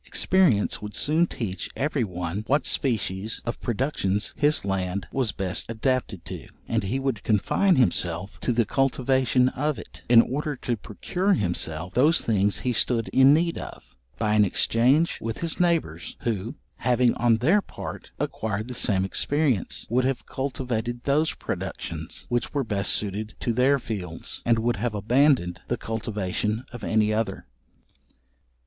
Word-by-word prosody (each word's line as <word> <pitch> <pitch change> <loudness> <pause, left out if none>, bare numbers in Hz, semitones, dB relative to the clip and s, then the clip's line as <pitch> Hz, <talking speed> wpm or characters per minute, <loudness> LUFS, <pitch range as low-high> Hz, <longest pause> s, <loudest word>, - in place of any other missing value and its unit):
Experience 170 - +2
would 105 0 -7
soon 160 +4 +2
teach 100 - -4
every 140 -2 0
one 90 0 -4
what 140 0 +2
species 110 -4 0
of 120 - -4
productions 105 -5 -1
his 150 -5 +2
land 95 -1 -2
was 130 -5 0
best 95 +2 -3
adapted 115 -4 -1
to, - - -7 0.2
and - - 0
he 120 +8 -1
would 135 -6 -2
confine 115 - +2
himself 90 - 0
to - - 0
the 115 -1 +2
cultivation 130 0 +2
of 150 +3 -1
it; - - -11
in 120 -1 +8
order 145 +3 -3
to 120 -1 -2
procure 180 - -1
himself 85 - -2
those 150 +7 +3
things 105 -2 +1
he 125 - 0
stood 115 0 +1
in 135 +1 +6
need 165 +3 +2
of, - - -10 0.2
by 105 +8 +1
an 105 -1 +5
exchange 125 - +2
with 115 0 -3
his 165 -2 -1
neighbours, 165 - 0
who, 115 0 -2 0.2
having 125 -1 +3
on 120 -1 +3
their 165 - +3
part - - -8
acquired 110 0 -3
the - - -4
same 95 -5 +1
experience, 140 - 0
would 125 +3 +1
have 130 0 -1
cultivated 120 -3 -3
those 150 +3 +1
productions - - -5
which 120 +3 -2
were 140 - +1
best 100 -4 0
suited 105 +1 -2
to 120 - -1
their 130 +4 +4
fields, 95 -10 -5
and 115 -1 +4
would 120 +1 0
have 110 +1 -2
abandoned 110 - +2
the 120 - -1
cultivation 105 0 -2
of 120 -2 -9
any 110 -1 +2
other. 110 +1 -2
115 Hz, 155 wpm, -25 LUFS, 105-135 Hz, 0.2 s, in